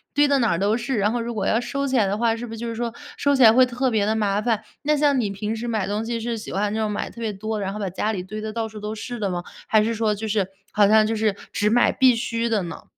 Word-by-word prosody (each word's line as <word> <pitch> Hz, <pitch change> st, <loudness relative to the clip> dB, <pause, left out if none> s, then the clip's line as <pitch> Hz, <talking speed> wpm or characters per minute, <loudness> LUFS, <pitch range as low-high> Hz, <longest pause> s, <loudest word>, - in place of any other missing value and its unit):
堆 290 Hz, +1 st, +5 dB
得 280 Hz, -1 st, +3 dB
哪 235 Hz, -, +2 dB
儿 170 Hz, -, 0 dB
都 205 Hz, +3 st, +2 dB
是， 245 Hz, +1 st, -2 dB
然 205 Hz, +1 st, +2 dB
后 240 Hz, -, -1 dB
如 235 Hz, +1 st, -4 dB
果 200 Hz, -3 st, -1 dB
要 225 Hz, -, +2 dB
收 275 Hz, +3 st, -2 dB
起 260 Hz, -1 st, +1 dB
来 220 Hz, -, +4 dB
的 200 Hz, -, -1 dB
话， 230 Hz, 0 st, +2 dB
是 240 Hz, +1 st, -6 dB
不 -, -, -10 dB
是 225 Hz, -, -6 dB
就 235 Hz, -, -5 dB
是 230 Hz, -, -3 dB
说 235 Hz, 0 st, -2 dB, 0.3 s
收 285 Hz, 0 st, +2 dB
起 265 Hz, -, +4 dB
来 220 Hz, -1 st, +9 dB
会 255 Hz, +2 st, +6 dB
特 250 Hz, +1 st, -1 dB
别 215 Hz, -3 st, +2 dB
地 220 Hz, -, +1 dB
麻 205 Hz, -2 st, +1 dB
烦？ 220 Hz, -1 st, 0 dB, 0.2 s
那 300 Hz, +1 st, +2 dB
像 285 Hz, -2 st, +3 dB
你 215 Hz, -4 st, 0 dB
平 210 Hz, +3 st, -3 dB
时 230 Hz, +2 st, -5 dB
买 220 Hz, -4 st, -1 dB
东 205 Hz, +2 st, -2 dB
西 230 Hz, 0 st, -2 dB
是 235 Hz, +1 st, -3 dB
喜 215 Hz, -, -8 dB
欢 205 Hz, +1 st, -1 dB
那 220 Hz, -, -1 dB
种 215 Hz, -1 st, 0 dB
买 210 Hz, -, -3 dB
特 235 Hz, -, -11 dB
别 220 Hz, -, -1 dB
多， 215 Hz, +2 st, -4 dB
然 195 Hz, -1 st, -2 dB
后 210 Hz, -, -6 dB
把 200 Hz, -, -2 dB
家 210 Hz, +4 st, -1 dB
里 190 Hz, -4 st, -3 dB
堆 215 Hz, +3 st, -7 dB
得 215 Hz, 0 st, -4 dB
到 225 Hz, 0 st, -2 dB
处 215 Hz, -1 st, -10 dB
都 210 Hz, +1 st, -4 dB
是 240 Hz, +2 st, -6 dB
的 200 Hz, -2 st, -1 dB
吗？ 175 Hz, -1 st, -3 dB, 0.2 s
还 215 Hz, -1 st, +4 dB
是 230 Hz, +2 st, 0 dB
说 220 Hz, -1 st, +1 dB
就 220 Hz, +2 st, -5 dB
是 205 Hz, -3 st, 0 dB, 0.2 s
好 205 Hz, -1 st, +4 dB
像 215 Hz, +1 st, +5 dB
就 225 Hz, -, -1 dB
是 215 Hz, -2 st, +1 dB, 0.2 s
只 210 Hz, -, +1 dB
买 240 Hz, +2 st, +4 dB
必 255 Hz, -2 st, +4 dB
需 230 Hz, 0 st, -1 dB
的 210 Hz, -4 st, +1 dB
呢？ 165 Hz, -1 st, -7 dB
220 Hz, 350 characters per minute, -23 LUFS, 210-235 Hz, 0.3 s, 来